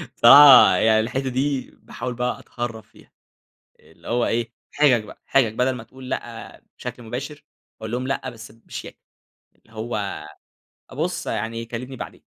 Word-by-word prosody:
الصراحة 135 -9 +9
يعني 110 +3 +3
الحتّة 130 +4 -2
دي 135 +1 -2
باحاول 125 +1 -7
بقى 125 +1 -2
أتهرَّب 115 -2 -6
فيها، - - -22 0.7
اللي - - -19
هو 120 0 +1
إيه، 115 0 -1 0.2
حجَج 135 -7 +3
بقى، 105 - -14
حجَج 125 -6 +2
بدل 125 +3 +1
ما 115 - -8
تقول 130 +3 -12
لأ - - -7 0.2
بشكل 125 0 -7
مباشِر، 135 +6 -7 0.4
أقول 110 0 -6
لهُم 125 +2 -3
لأ 135 - -2
بس 115 -2 -12
بشياكة، 115 +1 -10 0.6
اللي 110 - -27
هو 110 -6 -4 0.7
بُص - - -3
يعني 115 +1 -3
كلِّمني 125 +3 -7
بعدين. - - -9
120 Hz, 150 wpm, -22 LUFS, 115-130 Hz, 0.7 s, الصراحة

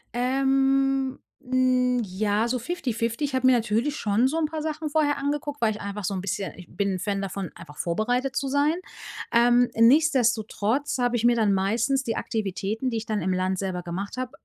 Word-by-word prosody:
Ähm, 270 +1 +1 0.2
n 255 -1 +2
ja, 205 +3 0
so 250 +1 -1
fifty-fifty. 235 -4 -2
Ich 280 - -5
habe 260 0 +3
mir 260 - +6
natürlich 235 +5 0
schon 215 +4 +2
so 315 +5 -2
'n 320 - +1
paar 310 0 -4
Sachen 310 0 -3
vorher 290 -1 +1
angeguckt, 290 +1 -3
weil 225 -2 +2
ich 210 - -7
einfach 200 0 -5
so 195 - -1
'n 190 - -3
bisschen 200 +1 -3
ich 180 -2 -12
bin 200 +2 -1
'n 185 - -3
Fan 200 +1 -2
davon, 195 -2 -4
einfach 150 +1 -12
vorbereitet 245 +9 -1
zu 275 - -1
sein, 285 +3 +2 0.6
ähm, 240 +1 +5
nichtsdestotrotz 240 -1 +2
habe 245 0 +1
ich 235 - 0
mir 240 0 +5
dann 215 -3 +2
meistens 230 +8 +1
die 230 -3 -2
Aktivitäten, 215 +3 -2
die 230 - -1
ich 220 - -4
dann 215 -2 -1
im 185 - 0
Land 185 +1 0
selber 185 -2 -3
gemacht 190 +6 -5
habe, 255 0 -3
240 Hz, 200 wpm, -25 LUFS, 205-270 Hz, 0.6 s, mir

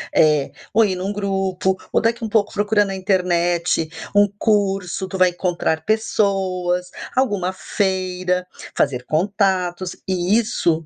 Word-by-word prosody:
eh 150 -3 +3 0.2
ou 225 +1 +5
ir 190 -2 -1
num 190 +3 -3
grupo, 190 -2 -1 0.2
ou - - +3
daqui 230 +1 0
um 220 - -4
pouco 210 -1 +1
procura 205 0 +2
na 195 -1 -4
internet 175 -4 +1 0.3
um 205 0 +6
curso, 195 -3 0
tu 190 - -5
vai 185 0 +5
encontrar 170 -3 -1
pessoas, 190 -5 0 0.3
alguma 205 -8 +1
feira, 185 -2 -1 0.3
fazer 125 -3 0
contatos 185 0 0
e 185 +3 +2
isso, 165 -8 0
190 Hz, 135 wpm, -21 LUFS, 180-205 Hz, 0.3 s, um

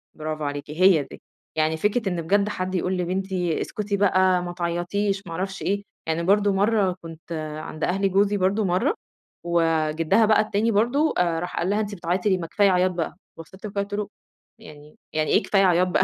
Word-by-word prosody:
برافو 155 0 -4
عليكِ 145 +1 -4
هي 175 -2 +4
دي، 135 - -13 0.3
يعني 160 0 +1
فكرة 210 +4 0
إن 175 -2 -2
بجد 200 +5 +1
حد 185 -2 -3
يقول 185 +1 0
لبنتي 180 -1 -1
اسكتي 210 -3 -3
بقى 185 -2 +3
ما 175 0 -5
تعيطيش 180 +4 -1
ما - - -8
أعرفش 195 +3 -4
إيه، 200 +1 -1 0.2
يعني 160 +1 -1
برضه 205 +3 +3
مَرّة 200 -1 +2
كنت 165 0 -12 0.3
عند 155 - -7
أهل 195 +2 +1
جوزي 200 +2 +2
برضه 200 +3 +1
مَرّة، 190 - +1 0.5
وجِدّها 165 +3 +2
بقى 215 0 +4
التاني 215 +1 0
برضه 245 +9 +2
راح 175 0 -1
قال 175 - 0
لها: 205 +1 +1
"أنتِ 205 -1 -3
بتعيّطي 180 +3 -1
ليه 190 - +3
ما 170 -2 -5
كفاية 200 +4 +3
عياط 185 0 +2
بقى" 175 -2 -3 0.2
بصّيت 190 +5 -11
له 210 - -5
كده 200 0 -1
قُلت 200 +1 -6
له: 205 0 -2 0.5
"يعني 150 -7 -14 0.2
يعني 155 0 0
ايه - - +4
كفاية 195 -1 +2
عياط 180 0 +3
بقى 180 - +2
185 Hz, 195 wpm, -24 LUFS, 170-200 Hz, 0.5 s, هي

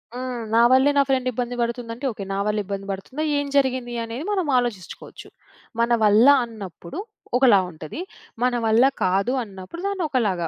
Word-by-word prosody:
హ్మ్. 250 -2 -4
నా 230 - +5
వల్లే 265 +2 +5
నా - - +7
ఫ్రెండ్ 255 -1 +1
ఇబ్బంది 245 0 -3
పడుతుందంటే 235 +2 -4
ఓకే. 205 -2 -7
నా 195 - -2
వల్ల 210 0 0
ఇబ్బంది 195 0 -5
పడుతుందా? 255 +11 -5
ఏం 285 - -1
జరిగింది 260 -3 0
అనేది 230 +6 -6
మనం 375 -6 0
ఆలోచించుకోచ్చు. 235 -8 -5 0.5
మన 235 +1 +1
వల్ల 215 +4 +6 0.2
అన్నప్పుడు 205 - -9 0.4
ఒకలా 240 -7 +6
ఉంటది, 155 - -9 0.4
మన 250 0 +2
వల్ల 225 +2 +4 0.2
కాదు 195 +7 +1
అన్నప్పుడు 195 - -10
దాన్ని 395 -3 -2
ఒకలాగా, 200 - 0
235 Hz, 160 wpm, -23 LUFS, 200-255 Hz, 0.5 s, నా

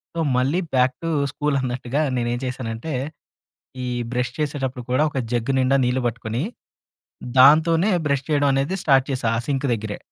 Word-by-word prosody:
So 165 - 0 0.2
మళ్ళీ 140 +8 +1
back 130 0 +3
to 165 - -1 0.2
school 145 -1 -1
అన్నట్టుగా 130 +2 -2
నేనెంచేశానంటే, 120 +2 -3 0.9
ఈ - - -3 0.3
బ్రష్ 125 0 -1
చేసేటప్పుడు 135 -4 -3
కూడా 130 +4 +3
ఒక 140 - -3
జగ్ 120 +1 0
నిండా 135 +1 +3
నీళ్లు 125 +1 0
పట్టుకొని, 115 +1 -3 1.0
దాంతోనే 160 +8 +6 0.2
బ్రష్ 140 -2 0
చేయడం 145 -2 +3
అనేది 140 +8 0
స్టార్ట్ 135 -3 +4
చేశా, 130 -3 -1
ఆ - - -1
సింకు 140 -1 0
దగ్గరే. 105 -1 -5
130 Hz, 150 wpm, -22 LUFS, 125-145 Hz, 1.0 s, దాంతోనే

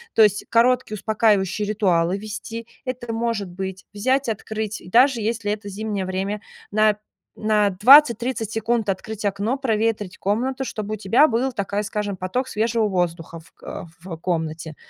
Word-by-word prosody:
То 220 - +7
есть 205 -1 +2
короткие 235 -1 +3
успокаивающие 210 -2 +1
ритуалы 185 -4 +1
ввести. 215 +2 -7 0.2
Это 245 -2 -4
может 225 -4 -2
быть, 190 +1 -6
взять, 260 +5 +1
открыть, 220 0 -4
даже 245 +4 +4
если 220 -1 -1
это 210 -1 -4
зимнее 205 -1 -3
время, 195 +3 -3 0.3
на 215 0 +3 0.4
на 215 -1 +2
20-30 235 +1 +5
секунд 225 -1 0
открыть 210 +2 -3
окно, 205 +6 0
проветрить 220 -6 -1
комнату, 250 +7 -1
чтобы 215 -4 -4
у - - -3
тебя 220 +9 +4
был, 250 +2 0
такая 205 -2 -2
скажем, 210 -1 -3
поток 185 +8 -2
свежего 225 -1 0
воздуха 170 -3 -2
в, 165 - -22
э, - - -7 0.2
в 175 -1 -7
комнате. 160 -2 -3
215 Hz, 150 wpm, -22 LUFS, 195-230 Hz, 0.4 s, То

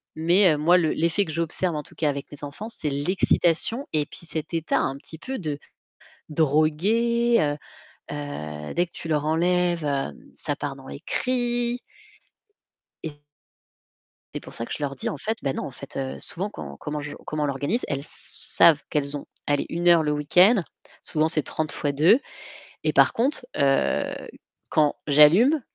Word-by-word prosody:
Mais 170 +2 +4
heu, - - -1
moi, 170 +5 +4
l'effet 170 +3 +1
que 160 - -6
j'observe 170 +1 +1
en 150 - -2
tout - - -18
cas 155 - 0
avec 140 0 -5
mes 145 0 -7
enfants, 160 +10 -7
c'est 155 -9 -2
l'excitation 175 - +1
et 150 -1 +1
puis 170 - -11
cet 160 0 -5
état 165 -1 0
un 135 - -1
petit 160 +3 -10
peu 265 +6 -5
de 150 -5 -3 0.7
drogué, 195 - +2 0.7
heu, 75 - -6
dès 175 +1 +1
que 170 - -23
tu 165 - -8
leur 150 -1 0
enlèves, 175 0 +1
hem, 140 - -2 0.2
ça - - -3
part - - -4
dans - - -14
les 70 0 -8
cris. 245 -1 -1 1.2
Et 160 - -4 1.2
c'est - - -4
pour - - -12
ça 115 - -2
que - - -7
je - - -5
leur 140 -1 -2
dis 130 - -3
en - - -4
fait: 220 +8 -3
«Bah 135 - 0
non, - - -4
en - - -5
fait». 140 +2 -11
Heu, 135 -1 -4
souvent, 195 +4 -5
quand 70 - -8
comment 150 - -5
je 145 0 -7
comment 155 -1 -2
on - - +1
l'organise, 145 - -1
elles 140 -2 -2
savent 155 -2 +3
qu'elles 145 -1 +1
ont, 145 - -8 0.2
allez, 145 -1 0
1 175 +1 0
heure 170 -2 +6
le 150 -1 0
week-end, 180 +8 +4 0.4
souvent 155 -1 +1
c'est 160 -2 +6
30 155 +1 -3
fois 145 - -2
2 165 - +5 0.6
et - - +1
par - - +5
contre, 255 +2 0
heu, 135 -1 +2 0.6
quand 150 -2 +2
j'allume, 175 - +6
155 Hz, 180 wpm, -24 LUFS, 145-180 Hz, 1.2 s, heure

